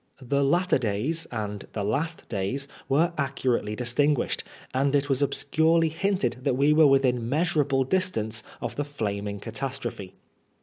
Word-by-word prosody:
The 140 Hz, +2 st, 0 dB
latter 175 Hz, +3 st, +3 dB
days 125 Hz, +9 st, -1 dB
and 105 Hz, -3 st, -4 dB
the 105 Hz, -, -2 dB
last 150 Hz, +11 st, -2 dB
days 115 Hz, +7 st, -2 dB, 0.2 s
were 165 Hz, +5 st, +3 dB
accurately 130 Hz, -6 st, 0 dB
distinguished, 125 Hz, +4 st, +1 dB, 0.3 s
and 135 Hz, +2 st, +2 dB
it 145 Hz, 0 st, +1 dB
was 135 Hz, 0 st, +1 dB
obscurely 160 Hz, +3 st, +2 dB
hinted 170 Hz, -, 0 dB
that 125 Hz, -, +1 dB
we 145 Hz, +2 st, +4 dB
were 155 Hz, -1 st, +6 dB
within 125 Hz, -4 st, +2 dB
measurable 145 Hz, -3 st, +2 dB
distance 125 Hz, -, 0 dB, 0.2 s
of -, -, -4 dB
the 145 Hz, -, 0 dB
flaming 105 Hz, -7 st, -3 dB
catastrophe. 120 Hz, -6 st, -5 dB
135 Hz, 140 wpm, -26 LUFS, 115-150 Hz, 0.3 s, were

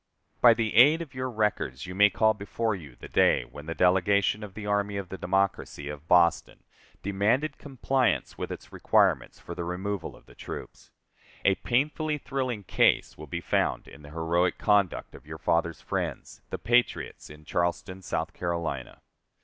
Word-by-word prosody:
By 120 Hz, -2 st, +8 dB
the 110 Hz, -2 st, -1 dB
aid 150 Hz, +8 st, +6 dB
of 145 Hz, -4 st, -14 dB
your 130 Hz, 0 st, -3 dB
records 105 Hz, -, -1 dB
you 90 Hz, -, -7 dB
may 105 Hz, +2 st, +6 dB
call 110 Hz, +1 st, +3 dB
before 110 Hz, +2 st, -2 dB
you 75 Hz, -10 st, -9 dB
the -, -, -11 dB
day -, -, +3 dB
when 75 Hz, +1 st, -12 dB
the 85 Hz, -, -4 dB
delegation 95 Hz, +4 st, +3 dB
of 100 Hz, -3 st, -9 dB
the 105 Hz, -, -6 dB
army 100 Hz, 0 st, 0 dB
of 95 Hz, -2 st, -5 dB
the 95 Hz, -, -6 dB
democracy 90 Hz, -6 st, -1 dB
of 75 Hz, +1 st, -8 dB
Boston 85 Hz, -2 st, +3 dB, 0.4 s
demanded 110 Hz, +10 st, 0 dB
compliance 130 Hz, -4 st, 0 dB
with -, -, -5 dB
its -, -, -9 dB
requirements -, -, +2 dB
for 85 Hz, -, -8 dB
the 85 Hz, 0 st, -4 dB
removal 90 Hz, +1 st, -4 dB
of -, -, -19 dB
the -, -, -17 dB
troops. -, -, -9 dB, 0.6 s
A 95 Hz, -, +6 dB
painfully 150 Hz, +8 st, 0 dB
thrilling 130 Hz, -6 st, -3 dB
case -, -, +2 dB
will 75 Hz, -, -10 dB
be 85 Hz, +4 st, -4 dB
found -, -, 0 dB
in 70 Hz, -, -13 dB
the 75 Hz, -, -12 dB
heroic 85 Hz, +3 st, 0 dB
conduct 100 Hz, -4 st, +1 dB
of -, -, -14 dB
your 80 Hz, 0 st, -7 dB
fathers' 85 Hz, 0 st, 0 dB
friends, -, -, -4 dB
the -, -, -4 dB
patriots 120 Hz, +3 st, 0 dB
in 75 Hz, 0 st, -13 dB
Charleston, 85 Hz, +3 st, -2 dB
South 80 Hz, -3 st, -3 dB
Carolina. 85 Hz, -7 st, -4 dB
95 Hz, 175 wpm, -27 LUFS, 85-115 Hz, 0.6 s, By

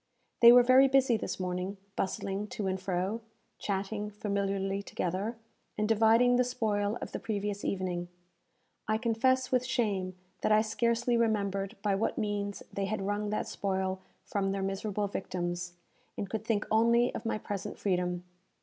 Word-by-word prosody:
They 235 Hz, 0 st, +11 dB
were 245 Hz, 0 st, +8 dB
very 260 Hz, +2 st, +7 dB
busy 265 Hz, -3 st, +4 dB
this 215 Hz, -, -3 dB
morning, 180 Hz, +2 st, -3 dB, 0.2 s
bustling 195 Hz, +2 st, -2 dB
to 210 Hz, -, -4 dB
and 190 Hz, 0 st, -1 dB
fro, 190 Hz, +4 st, -1 dB, 0.4 s
chatting 205 Hz, +1 st, -2 dB
familiarly 200 Hz, -1 st, -1 dB
together, 200 Hz, +4 st, -3 dB, 0.4 s
and 210 Hz, 0 st, +1 dB
dividing 225 Hz, +3 st, +5 dB
the 250 Hz, -, +4 dB
spoil 215 Hz, -3 st, 0 dB
of -, -, -7 dB
the -, -, -4 dB
previous 205 Hz, -1 st, -3 dB
evening. 180 Hz, -2 st, -2 dB, 0.8 s
I 215 Hz, 0 st, +2 dB
confess 255 Hz, +3 st, +1 dB
with 255 Hz, -1 st, +3 dB
shame 205 Hz, -8 st, -1 dB, 0.3 s
that -, -, +1 dB
I 215 Hz, 0 st, +5 dB
scarcely 235 Hz, +2 st, +1 dB
remembered 200 Hz, -2 st, 0 dB
by 205 Hz, -2 st, +2 dB
what 195 Hz, +3 st, 0 dB
means 205 Hz, -1 st, -2 dB
they 200 Hz, -, -1 dB
had 195 Hz, -1 st, -2 dB
wrung 205 Hz, +1 st, -1 dB
that 210 Hz, -, -1 dB
spoil 190 Hz, -1 st, -2 dB, 0.2 s
from 195 Hz, -1 st, -1 dB
their 195 Hz, 0 st, -2 dB
miserable 195 Hz, +1 st, -1 dB
victims, 175 Hz, -3 st, -3 dB, 0.4 s
and 200 Hz, -, -3 dB
could 215 Hz, +2 st, -3 dB
think 220 Hz, -2 st, +1 dB
only 235 Hz, +2 st, +4 dB
of -, -, -5 dB
my 225 Hz, -, -1 dB
present 200 Hz, -2 st, -5 dB
freedom. 180 Hz, -2 st, -1 dB
205 Hz, 160 wpm, -30 LUFS, 195-225 Hz, 0.8 s, They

